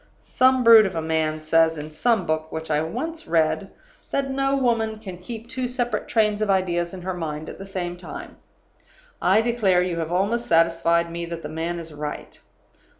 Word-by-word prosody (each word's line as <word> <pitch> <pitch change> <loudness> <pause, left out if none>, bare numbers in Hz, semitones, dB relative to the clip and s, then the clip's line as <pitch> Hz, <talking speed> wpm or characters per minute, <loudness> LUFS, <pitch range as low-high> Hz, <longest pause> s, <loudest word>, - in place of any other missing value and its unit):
"Some 260 0 +2
brute 225 -3 +8
of 190 - -6
a 165 - -1
man 155 -1 -1
says, 165 +1 +3
in 150 +1 -7
some 220 +4 +1
book 155 0 -2
which 160 0 -5
I 150 0 +2
once 320 - -4
read, 165 +4 +1 0.4
that 275 -1 -1
no 275 +1 +1
woman 230 -4 +1
can 190 -5 -9
keep 225 +4 -8
two 255 +1 -3
separate 245 -1 -2
trains 215 -2 +1
of 215 - 0
ideas 175 -3 +1
in 185 -2 -9
her 185 +1 -2
mind 155 -3 -5
at - - -10
the 195 - -8
same 180 -2 -4
time. 180 - -9 0.8
I 195 +4 +4
declare 210 -7 +2
you 175 -2 -2
have 165 0 -3
almost 205 +7 0
satisfied 170 0 +3
me 170 0 -4
that 170 -1 -6
the 150 - -5
man 165 +2 -3
is 165 -2 -8
right. 150 0 -6
180 Hz, 195 wpm, -23 LUFS, 165-225 Hz, 0.8 s, brute